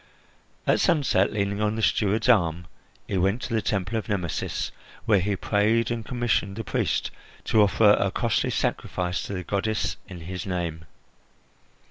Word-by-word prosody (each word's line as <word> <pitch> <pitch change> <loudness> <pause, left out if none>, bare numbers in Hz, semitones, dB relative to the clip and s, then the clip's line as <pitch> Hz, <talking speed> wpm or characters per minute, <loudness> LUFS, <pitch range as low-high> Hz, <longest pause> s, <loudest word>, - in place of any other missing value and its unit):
At - - +3
sunset, 135 - +2
leaning 100 0 -1
on 105 0 +1
the 110 - -3
steward's 105 +2 +2
arm, 90 -7 +3 0.4
he 95 - -1
went 95 +6 +1
to - - -4
the 110 - +2
Temple 105 +2 -1
of 110 - -9
Nemesis, 90 -6 -2 0.3
where 105 -3 +4
he 100 +2 0
prayed 110 +4 +1
and 115 -1 -2
commissioned 120 -4 -1
the 115 - -4
priest - - -1 0.3
to 110 - +3
offer 105 +1 +5
a 100 - +2
costly 115 +3 0
sacrifice 90 -2 -1
to - - -5
the 90 -1 -3
goddess 105 +3 -1
in 90 -3 -9
his 90 +3 -6
name. 85 -3 -3
100 Hz, 160 wpm, -25 LUFS, 90-110 Hz, 0.4 s, offer